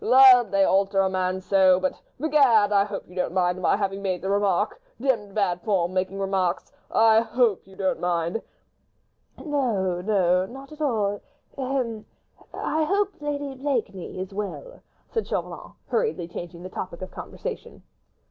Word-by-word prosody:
"Lud! 255 -3 +7
they 195 0 +3
alter 195 0 +3
a 190 - +2
man 185 0 -1
so... 185 -1 +4
but... 185 0 -2 0.2
begad! 270 -9 +4
I 200 -1 +4
hope 205 -1 -6
you 180 - -15
don't 180 -1 -2
mind 180 0 +1
my 185 - +3
having 195 -1 -2
made 185 -2 -2
the 190 - -1
remark?... 200 - +1 0.2
Demmed 225 -7 -1
bad 180 -4 0
form 185 -4 0
making 190 +1 -1
remarks.... 190 -2 -1 0.2
I 225 0 +5
hope 230 -4 +1
you 190 - -15
don't 190 -1 -1
mind?" 175 +4 -1 1.0
"No, 220 - -1
no, 185 -2 +2
not 270 +4 -11
at 305 0 -11
all—hem! 245 0 -2 0.5
I 315 0 -1
hope 395 +5 +1
Lady 285 -1 -3
Blakeney 250 -11 -3
is 190 +1 -5
well," 210 - -6 0.3
said 450 - -3
Chauvelin, - - -4
hurriedly 455 - -1
changing 175 0 -8
the 185 - -7
topic 185 -1 -6
of 185 - -7
conversation. - - -7
200 Hz, 155 wpm, -25 LUFS, 185-260 Hz, 1.0 s, Lud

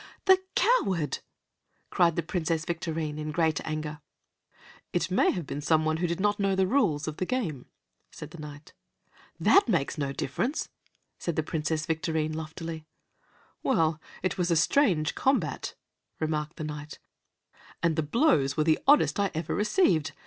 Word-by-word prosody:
"The 380 -1 +6
coward!" 195 - +2 0.7
cried 170 -2 +3
the 170 - -1
Princess 165 -2 -1
Victorine, 160 -3 -3
in 155 0 -3
great 160 -1 +1
anger. 155 0 -4 0.9
"It 175 +1 0
may 185 - +4
have 175 -4 -2
been 145 - -5
some 155 +1 +2
one 155 0 +1
who 175 +2 0
did 170 +1 -2
not 205 +1 +1
know 195 -1 +2
the 190 0 +3
rules 175 - +1
of 155 0 -4
the 185 - -1
game," 180 - -2 0.4
said - - -10
the 170 - -11
Knight. 150 0 -10 0.7
"That 395 -10 +5
makes 155 -5 0
no 140 -1 -1
difference," 230 - -2 0.5
said 170 -2 -2
Princess 155 0 -1
Victorine 160 -1 -1
loftily. 160 0 -6 0.7
"Well, 160 -1 +1 0.2
it 185 +1 -1
was 175 0 +1
a 170 - +3
strange 165 - +3
combat," 215 - 0 0.4
remarked 155 0 -2
the 155 - -6
Knight, 150 0 -6 0.9
"and 165 -2 +2
the 160 - +1
blows 150 - +2
were 155 - +3
the 160 0 +3
oddest 290 -6 +5
I 200 -1 +2
ever 160 0 -2
received. 210 - +2
160 Hz, 155 wpm, -28 LUFS, 155-185 Hz, 0.9 s, The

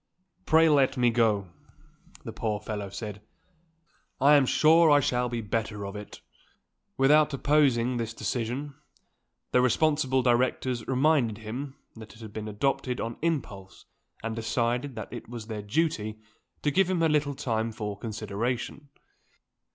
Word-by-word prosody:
"Pray 160 +1 +5
let 140 -3 +3
me 120 -1 +3
go," 110 -5 +1 0.7
the - - -7
poor 105 -2 -2
fellow 105 -2 -5
said: 105 +1 -7 1.0
"I 140 +2 +6
am 140 -3 +5
sure 160 +4 +5
I 145 -1 +6
shall 125 -2 0
be 120 -1 -3
the 105 - -11
better 110 -1 -2
for 100 0 -6
it." 105 0 -9 0.8
Without 150 +2 +4
opposing 130 -4 +2
this 115 -1 -3
decision, 120 +5 -3 0.8
the 125 - +4
responsible 130 0 +2
directors 125 0 +1
reminded 130 -5 +2
him 125 +6 -6 0.2
that 110 0 -12
it - - -17
had 110 -2 -10
been 110 -1 -5
adopted 125 +3 -1
on 115 0 -4
impulse, 125 - -3 0.4
and 115 0 -3
decided 120 +3 -1
that 110 - -7
it 120 -2 -8
was 120 -2 -7
their 110 -2 -5
duty 110 -2 -1 0.5
to 145 - +2
give 185 +4 +2
him 175 -3 +1
a - - +5
little 150 -2 +1
time 115 -5 -1
for 105 -2 -5
consideration. 115 +6 -4
120 Hz, 150 wpm, -27 LUFS, 110-140 Hz, 1.0 s, I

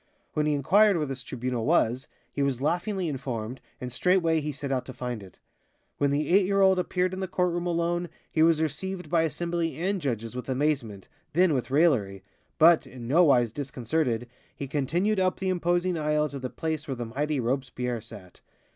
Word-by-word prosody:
When 150 0 +1
he 150 - +2
inquired 195 +8 +4
where 155 - 0
this 135 -2 -5
Tribunal 125 0 -3
was, 120 +4 +2 0.3
he 140 - -2
was 140 -3 0
laughingly 175 +6 -1
informed, 130 -4 -4 0.2
and 125 -1 -5
straightway 165 -1 +2
he 150 +1 -3
set 140 0 -5
out 130 -2 0
to 130 - -7
find 125 -3 -4
it. 95 -2 -14 0.6
When 145 - +3
the 145 +1 0
eight 190 +1 +4
year 195 0 +1
old 190 -1 +5
appeared 180 0 0
in 185 - -4
the 190 - -2
court 180 -1 0
room 175 0 -2
alone, 175 0 0 0.2
he 155 - +1
was 160 -1 +4
received 180 +5 -4
by 170 -2 +4
assembly 165 -1 -2
and 190 +3 -1
judges 115 -4 -3
with 125 +1 -6
amazement, 130 -7 -1 0.3
then 175 0 +4
with 130 -2 -1
raillery, 125 - +2 0.3
but, 165 +1 +6
in 120 -2 -9
no 170 +7 +5
wise 120 -6 +4
disconcerted, 125 -2 -2 0.3
he 140 - -5
continued 170 +10 0
up 185 -1 +1
the 190 - -1
imposing 175 -1 +1
aisle 150 0 +1
to 140 0 -6
the 130 -1 -4
place 160 0 -4
where 135 - -2
the 120 -1 -4
mighty 145 +5 -2
Robespierre 125 -1 -2
sat. 95 -5 -13
150 Hz, 195 wpm, -27 LUFS, 125-175 Hz, 0.6 s, but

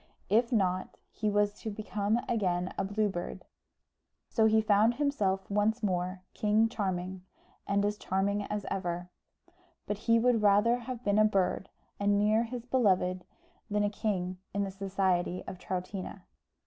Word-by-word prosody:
If 230 +5 +3
not, 185 -5 0
he 215 - -1
was 205 0 +2
to 220 - -3
become 210 +1 -1
again 185 -5 0
a - - -1
Blue 205 +2 0
Bird. 175 -3 -5 0.8
So 220 - +3
he 220 0 +4
found 215 +2 +4
himself 205 -10 0
once 210 +3 +1
more 185 -1 -1
King 215 +2 +2
Charming, 185 -4 -3 0.5
and 200 0 +2
as 210 0 -1
charming 200 +2 0
as 210 -1 -3
ever; 180 -1 -3 0.7
but 205 -1 -3
he 230 - +7
would 230 -1 +3
rather 210 +4 +4
have 245 0 -6
been 205 +1 +2
a - - +7
bird 195 -2 +1 0.3
and 205 0 +3
near 215 +3 +3
his 240 0 -6
beloved, 185 -8 +2 0.4
than 210 0 +1
a 205 - +1
king 185 -4 -2 0.2
in 200 - +1
the 195 - -3
society 190 -2 0
of 185 - -7
Troutina. 185 +1 -5
205 Hz, 155 wpm, -30 LUFS, 190-220 Hz, 0.8 s, he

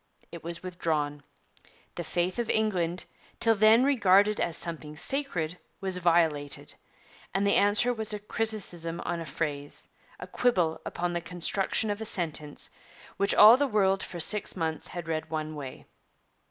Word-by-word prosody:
It 170 - -9
was 170 +1 -5
withdrawn. 155 -5 -2 0.7
The - - -5
faith 180 +5 -2
of 235 - -2
England 185 -5 0 0.3
till 225 -1 +4
then 220 +3 +5
regarded 210 -6 +4
as 170 - -1
something 155 -3 -5
sacred 180 - -1 0.2
was 190 -2 -1
violated; 165 -5 +1 0.6
and 195 +1 +2
the 200 - +3
answer 210 +5 +3
was 220 -2 -4
a 210 - 0
criticism 205 -6 -2
on 175 -1 -3
a 165 - -6
phrase 145 -1 -3 0.3
a - - -6
quibble 180 -10 0
upon 175 0 -3
the 175 - -2
construction 185 +5 0
of 205 +2 -4
a - - -3
sentence, 155 -7 -2 0.5
which 200 0 +2
all 220 +4 +9
the 285 +1 +1
world 195 -4 +2
for 175 - -7
six 210 +5 +3
months 160 -3 -3
had 175 -2 -7
read 160 -1 -3
one 155 -1 -4
way. 140 -4 -8
180 Hz, 155 wpm, -28 LUFS, 165-210 Hz, 0.7 s, all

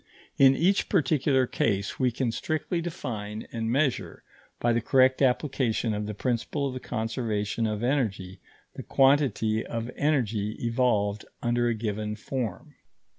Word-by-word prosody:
In 135 0 +7
each 185 +7 +2
particular 140 -6 +2
case 100 -4 -1
we 130 -2 +3
can 120 0 -1
strictly 160 +6 -2
define 110 - -5
and 115 -1 -2
measure, 135 0 0 0.4
by 120 0 +2
the 120 - +1
correct 130 +2 +3
application 125 -4 +1
of 105 0 -3
the 105 - -5
principle 130 +5 -1
of 130 - -4
the 130 - -5
conservation 110 -2 -2
of 105 +1 -3
energy, 100 -8 -1 0.3
the - - -7
quantity 135 -6 +2
of 115 +1 -4
energy 115 -8 0
evolved 115 -4 0 0.2
under 120 0 +1
a 120 - +1
given 105 -1 -3
form. 120 +2 -5
120 Hz, 140 wpm, -27 LUFS, 110-135 Hz, 0.4 s, In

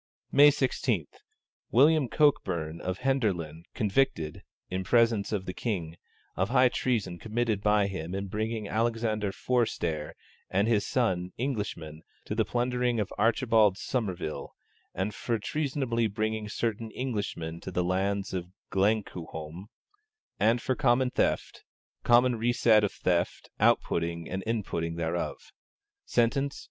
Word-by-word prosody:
May 145 +1 +8
16. 130 - 0 0.6
William 145 +2 +5
Cokburne 85 - +1
of 95 +1 -4
Henderland, 95 - -1
convicted 100 - 0 0.3
(in 95 +1 -3
presence 115 -1 +3
of 100 -3 -2
the 90 - -4
King) 90 -8 -3 0.4
of 95 +2 0
high 125 0 +5
treason 105 -10 -1
committed 110 -2 -1
by 105 0 +3
him 95 -2 -4
in 100 0 -3
bringing 110 +2 -3
Alexander 110 -2 0
Forestare 85 -12 -1 0.3
and 100 +3 +2
his 110 -3 +2
son, 95 -8 0
Englishmen, 105 - -4 0.2
to - - -3
the 110 +1 +2
plundering 125 +1 0
of 105 -1 -2
Archibald 110 -4 +3
Somervile; 95 - -3 0.4
and 95 +3 -2
for 115 -2 -1
treasunably 130 -2 -1
bringing 110 0 -2
certain 115 0 -2
Englishmen 100 -10 -3
to - - -7
the 90 -1 0
lands 95 +2 -1
of 90 -2 -3 0.2
Glenquhome; 95 -4 -2 0.7
and 115 +3 +3
for 130 - +1
common 130 -2 +2
theft, - - -1 0.4
common 120 0 +4
reset 115 -2 +4
of 105 - +1
theft, 90 -1 -1
out - - +5
putting 85 0 -2
and 95 +1 -3
in 115 -2 0
putting 85 -2 -3
thereof. 85 +1 -3 0.5
Sentence. 135 +4 +1
105 Hz, 130 wpm, -28 LUFS, 90-120 Hz, 0.7 s, May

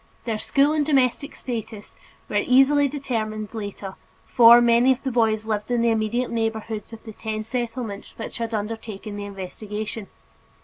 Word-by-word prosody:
Their 225 -2 -2
school 280 +5 +2
and 305 -1 +2
domestic 280 -1 +1
status 225 -4 -6 0.3
was 205 0 -1
easily 275 +3 +5
determined 225 -7 -4
later, 200 -3 -6 0.3
for 235 0 +8
many 240 +2 +4
of 255 - -11
the 265 - -1
boys 220 -2 +1
lived 215 0 -2
in 240 -1 +1
the 235 - +3
immediate 225 +3 0
neighborhoods 225 -2 -3
of 225 -1 -11
the 220 - -9
ten 215 0 -4
Settlements 230 -3 -5
which 225 - -7
had 230 0 -3
undertaken 215 -1 -5
the 205 0 -5
investigation. 205 +2 -6
225 Hz, 160 wpm, -23 LUFS, 215-245 Hz, 0.3 s, for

